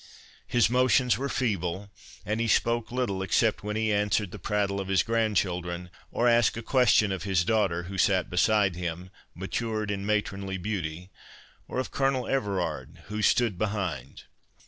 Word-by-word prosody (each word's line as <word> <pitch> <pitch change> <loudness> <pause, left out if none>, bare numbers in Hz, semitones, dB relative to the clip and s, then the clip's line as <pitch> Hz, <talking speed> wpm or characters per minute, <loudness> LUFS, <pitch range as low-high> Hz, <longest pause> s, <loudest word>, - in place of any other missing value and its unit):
His 120 -1 +3
motions 125 0 +3
were 140 +1 -2
feeble, 100 -5 -2 0.3
and 105 +3 -1
he 115 - 0
spoke 115 +1 +1
little, 120 -7 -1
except 105 +4 +1
when 105 0 -3
he 110 -1 +1
answered 105 -1 +1
the - - -8
prattle 100 -1 -1
of 95 - -6
his 95 -1 +2
grandchildren, 90 -6 -1 0.2
or 120 - +1
asked 120 -2 +3
a 115 - -5
question 120 -5 +3
of 95 -2 -3
his 95 -2 +1
daughter, 95 -6 +1
who 95 +2 -6
sate 95 -1 +3
beside 95 0 +2
him, 90 +1 -5 0.2
matured 105 +3 -3
in 100 -1 -3
matronly 100 -2 -1
beauty, 90 -2 -4 0.6
or - - -5
of 130 - -2
Colonel 135 -2 0
Everard 90 - -2
who 105 0 -3
stood 105 -3 +2
behind. 90 - -3
100 Hz, 160 wpm, -27 LUFS, 90-115 Hz, 0.6 s, His